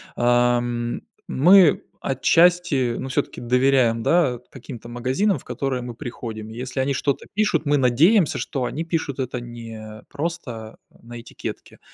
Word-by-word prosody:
ам, 120 Hz, 0 st, +1 dB, 0.3 s
мы 175 Hz, +3 st, +5 dB, 0.2 s
отчасти, 150 Hz, -2 st, +2 dB
ну 130 Hz, -, -4 dB
всё-таки 140 Hz, +2 st, -2 dB
доверяем, 125 Hz, -2 st, +2 dB
да, 145 Hz, -7 st, +2 dB
каким-то 125 Hz, -3 st, -10 dB
магазинам 130 Hz, -, 0 dB
в -, -, -17 dB
которые 135 Hz, -2 st, -3 dB
мы 120 Hz, -1 st, -7 dB
приходим. 115 Hz, -4 st, -7 dB
Если 125 Hz, +3 st, -5 dB
они 135 Hz, +1 st, +1 dB
что-то 140 Hz, +1 st, -1 dB
пишут, 210 Hz, -4 st, +1 dB
мы 145 Hz, 0 st, +3 dB
надеемся, 150 Hz, -, +3 dB
что 130 Hz, -3 st, -3 dB
они 160 Hz, -, -3 dB
пишут 160 Hz, -5 st, -3 dB
это 125 Hz, -1 st, -3 dB
не 115 Hz, -2 st, -9 dB
просто 140 Hz, -8 st, -5 dB
на 120 Hz, +1 st, -11 dB
этикетке, -, -, -8 dB
130 Hz, 135 wpm, -22 LUFS, 120-150 Hz, 0.3 s, мы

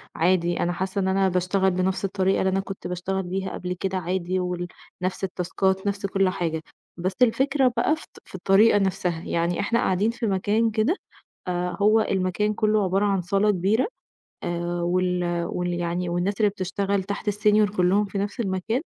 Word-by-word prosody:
عادي 175 Hz, 0 st, +2 dB
أنا 175 Hz, -, 0 dB
حاسة 190 Hz, +2 st, -2 dB
إن 190 Hz, -, 0 dB
أنا 190 Hz, 0 st, +2 dB
باشتغل 185 Hz, +1 st, +1 dB
بنَفْس 185 Hz, +2 st, 0 dB
الطريقة 195 Hz, 0 st, +1 dB
اللي 190 Hz, -, +2 dB
أنا 190 Hz, +1 st, +1 dB
كنت 195 Hz, 0 st, -6 dB
باشتغل 185 Hz, +2 st, -2 dB
بيها 190 Hz, +2 st, -3 dB
قبل 180 Hz, 0 st, -4 dB
كده 190 Hz, -1 st, -1 dB
عادي، 185 Hz, +1 st, -1 dB
وال 180 Hz, -1 st, -2 dB, 0.3 s
نَفْس 185 Hz, +1 st, -2 dB
التاسكات 190 Hz, +1 st, -1 dB
نَفْس 200 Hz, 0 st, -1 dB
كُلّ 195 Hz, -1 st, +2 dB
حاجة، 165 Hz, -4 st, -2 dB, 0.4 s
بس 185 Hz, +2 st, -1 dB
الفكرة 265 Hz, +2 st, +3 dB
بقى 305 Hz, +7 st, +3 dB
في 315 Hz, -, -12 dB
الط -, -, -19 dB
في -, -, -12 dB
الطريقة 195 Hz, +4 st, +5 dB
نفسها، 180 Hz, -3 st, -1 dB
يعني 170 Hz, +1 st, -1 dB
إحنا 230 Hz, +3 st, +1 dB
قاعدين 195 Hz, +4 st, +1 dB
في 230 Hz, 0 st, -3 dB
مكان 210 Hz, +4 st, +1 dB
كده 225 Hz, -, +1 dB, 0.5 s
آآ، 180 Hz, 0 st, -1 dB
هو 215 Hz, +2 st, +5 dB
المكان 195 Hz, +1 st, 0 dB
كُلّه 215 Hz, -1 st, +2 dB
عبارة 195 Hz, +2 st, +1 dB
عن 195 Hz, -2 st, +1 dB
صالة 195 Hz, +4 st, +2 dB
كبيرة 205 Hz, -, +1 dB, 0.6 s
آآ، 175 Hz, 0 st, -2 dB
وال 175 Hz, -1 st, 0 dB
وال 175 Hz, 0 st, -2 dB
يعني 175 Hz, +1 st, -2 dB
والناس 175 Hz, +3 st, 0 dB
اللي 210 Hz, -2 st, +4 dB
بتشتغل 195 Hz, 0 st, -1 dB
تحت 200 Hz, +2 st, -3 dB
الsenior 210 Hz, 0 st, +2 dB
كلّهم 185 Hz, +3 st, +3 dB
في 200 Hz, 0 st, -6 dB
نَفْس 205 Hz, +5 st, -3 dB
المكان 210 Hz, +4 st, -1 dB
190 Hz, 180 wpm, -24 LUFS, 180-205 Hz, 0.6 s, الطريقة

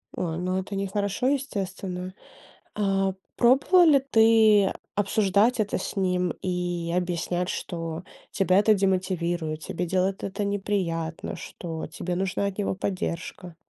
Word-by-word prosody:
А, 165 Hz, -2 st, -2 dB
ну 185 Hz, +1 st, -1 dB
это 195 Hz, +2 st, -5 dB
нехорошо, 200 Hz, +4 st, -1 dB
естественно. 190 Hz, -9 st, -3 dB, 0.6 s
А 195 Hz, -2 st, +1 dB, 0.2 s
пробовала 275 Hz, +9 st, +5 dB
ли 295 Hz, -4 st, +6 dB
ты 220 Hz, -3 st, +5 dB, 0.2 s
обсуждать 205 Hz, +3 st, +2 dB
это 210 Hz, -1 st, 0 dB
с -, -, -5 dB
ним 180 Hz, -2 st, +1 dB
и 175 Hz, -2 st, -2 dB
объяснять, 180 Hz, 0 st, -1 dB
что: 165 Hz, -2 st, -4 dB, 0.3 s
тебя 185 Hz, -1 st, +3 dB
это 215 Hz, +1 st, +5 dB
демотивирует, 175 Hz, -5 st, -1 dB
тебе 175 Hz, +3 st, -4 dB
делает 185 Hz, +2 st, 0 dB
это 200 Hz, +1 st, -3 dB
неприятно, 190 Hz, -5 st, -2 dB
что 165 Hz, -2 st, -6 dB
тебе 170 Hz, +3 st, -4 dB
нужна 190 Hz, +2 st, -1 dB
от 200 Hz, 0 st, -4 dB
него 205 Hz, -, 0 dB
поддержка? 180 Hz, -2 st, -4 dB
190 Hz, 125 wpm, -26 LUFS, 175-205 Hz, 0.6 s, ли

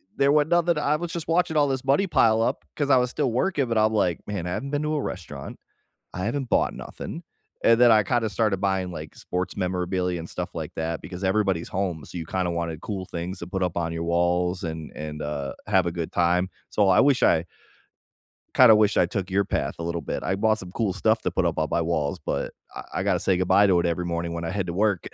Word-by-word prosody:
there 140 Hz, +1 st, +3 dB
was 150 Hz, 0 st, +4 dB
nothing 170 Hz, -1 st, +2 dB
I 150 Hz, 0 st, +2 dB
was 170 Hz, +2 st, -4 dB
just 170 Hz, -4 st, -5 dB
watching 165 Hz, -2 st, +1 dB
all 145 Hz, -, +4 dB
this 130 Hz, -2 st, -2 dB
money 140 Hz, +9 st, +2 dB
pile 110 Hz, -8 st, +3 dB
up, 125 Hz, +4 st, 0 dB
'cause 145 Hz, -2 st, 0 dB
I 130 Hz, -, +7 dB
was 125 Hz, 0 st, +2 dB
still 135 Hz, -4 st, -1 dB
working, 140 Hz, +2 st, +1 dB
but 115 Hz, -1 st, 0 dB
I'm 110 Hz, 0 st, +4 dB
like, 90 Hz, -5 st, +1 dB
"Man, 95 Hz, -4 st, -3 dB
I -, -, -3 dB
haven't 140 Hz, +9 st, -4 dB
been 145 Hz, +1 st, -1 dB
to 155 Hz, 0 st, -1 dB
a 145 Hz, -, 0 dB
restaurant. 90 Hz, -8 st, -7 dB, 0.5 s
I 90 Hz, -, -4 dB
haven't 130 Hz, +3 st, -2 dB
bought -, -, +2 dB
nothing." -, -, -7 dB, 0.4 s
And 115 Hz, +1 st, +5 dB
then, 120 Hz, -1 st, +7 dB
I 110 Hz, -1 st, +6 dB
kinda 115 Hz, +2 st, 0 dB
started 105 Hz, 0 st, +1 dB
buying, 95 Hz, -2 st, 0 dB
like, 80 Hz, -3 st, -8 dB
sports 90 Hz, +1 st, -4 dB
memorabilia, 90 Hz, -1 st, -1 dB
and 85 Hz, -, -7 dB
stuff -, -, -5 dB
like -, -, -5 dB
that, 80 Hz, 0 st, -3 dB
because 90 Hz, +1 st, -8 dB
everybody's 95 Hz, -3 st, +1 dB
home, 90 Hz, -5 st, -2 dB
so 90 Hz, -, -8 dB
you 80 Hz, -, -5 dB
kinda 90 Hz, 0 st, -1 dB
wanted 85 Hz, -2 st, -3 dB
cool 95 Hz, -3 st, -4 dB
things 90 Hz, +2 st, -5 dB
to 85 Hz, -, -7 dB
put 95 Hz, +1 st, -3 dB
up 90 Hz, -1 st, -1 dB
on 85 Hz, -1 st, -1 dB
your 85 Hz, 0 st, -3 dB
walls, 90 Hz, +1 st, +1 dB
and 80 Hz, -1 st, -5 dB
and, 75 Hz, 0 st, -6 dB
uh, 75 Hz, -2 st, -4 dB
have 95 Hz, -3 st, +3 dB
a 85 Hz, -, -1 dB
good 85 Hz, -2 st, -4 dB
time. 90 Hz, +2 st, +2 dB, 0.2 s
So 100 Hz, -2 st, +2 dB
I 95 Hz, -, +5 dB
wish 140 Hz, -2 st, +3 dB
I 80 Hz, +1 st, +4 dB, 1.1 s
kinda 120 Hz, -4 st, +8 dB
wish 105 Hz, -1 st, +3 dB
I -, -, +5 dB
took 95 Hz, -3 st, -4 dB
your 100 Hz, +1 st, +1 dB
path, -, -, -2 dB
a -, -, -4 dB
little 85 Hz, 0 st, -2 dB
bit. -, -, -4 dB
I 95 Hz, -, 0 dB
bought 110 Hz, +2 st, +2 dB
some 90 Hz, -1 st, -9 dB
cool 105 Hz, -1 st, 0 dB
stuff 110 Hz, +3 st, +1 dB
to 90 Hz, -, -1 dB
put 90 Hz, 0 st, 0 dB
up 85 Hz, -, 0 dB
on 80 Hz, 0 st, 0 dB
my 85 Hz, -, +2 dB
walls, 80 Hz, -3 st, -1 dB
but -, -, -2 dB, 0.2 s
I -, -, -6 dB
I -, -, 0 dB
gotta -, -, +1 dB
say 95 Hz, -2 st, +1 dB
goodbye 100 Hz, +3 st, +4 dB
to 90 Hz, -3 st, +4 dB
it -, -, 0 dB
every 85 Hz, +1 st, 0 dB
morning 85 Hz, 0 st, -2 dB
when 85 Hz, -, -4 dB
I 85 Hz, -, -2 dB
head 100 Hz, -2 st, -2 dB
to 85 Hz, -, -3 dB
work. 100 Hz, -1 st, +1 dB
95 Hz, 250 wpm, -25 LUFS, 85-115 Hz, 1.1 s, kinda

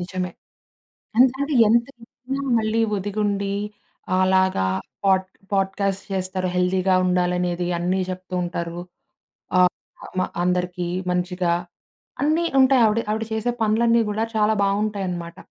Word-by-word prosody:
నిజమే. 180 Hz, 0 st, -3 dB, 0.9 s
అంతంటే, 265 Hz, +4 st, +3 dB, 0.2 s
ఎంత 235 Hz, +1 st, +4 dB
చేసినా 255 Hz, +3 st, -6 dB, 0.2 s
మళ్ళీ 220 Hz, +1 st, 0 dB
వదిగుండి. 200 Hz, 0 st, -1 dB, 0.7 s
అలాగా 185 Hz, -, +2 dB, 0.4 s
పోడ్ 190 Hz, -1 st, +3 dB, 0.3 s
పోడ్ 195 Hz, -1 st, +1 dB
కాస్ట్ 195 Hz, -1 st, -1 dB
చేస్తారు. 185 Hz, 0 st, -2 dB
హెల్దీగా 185 Hz, +1 st, +2 dB
ఉండాలనేది 180 Hz, -1 st, 0 dB
అన్నీ, 180 Hz, +2 st, 0 dB
చెప్తూ 185 Hz, 0 st, -8 dB
ఉంటారు. 170 Hz, 0 st, -4 dB, 0.8 s
ఆ! -, -, +6 dB, 0.6 s
మా 185 Hz, -, +1 dB, 0.2 s
అందరిక 180 Hz, 0 st, 0 dB, 0.4 s
మంచిగా 180 Hz, -1 st, 0 dB, 0.7 s
అన్నీ, 310 Hz, +4 st, +2 dB, 0.2 s
ఉంటాయి 260 Hz, -1 st, +5 dB
ఆవిడ 215 Hz, +1 st, +2 dB
ఆవిడ 220 Hz, +1 st, -1 dB
చేసే 220 Hz, +2 st, 0 dB
పనులన్నీ 230 Hz, +2 st, +3 dB
కూడా 215 Hz, +2 st, -1 dB
చాలా 215 Hz, 0 st, +3 dB
బావుంటాయనామాట. 195 Hz, -4 st, -2 dB
195 Hz, 110 wpm, -23 LUFS, 180-220 Hz, 0.9 s, ఆ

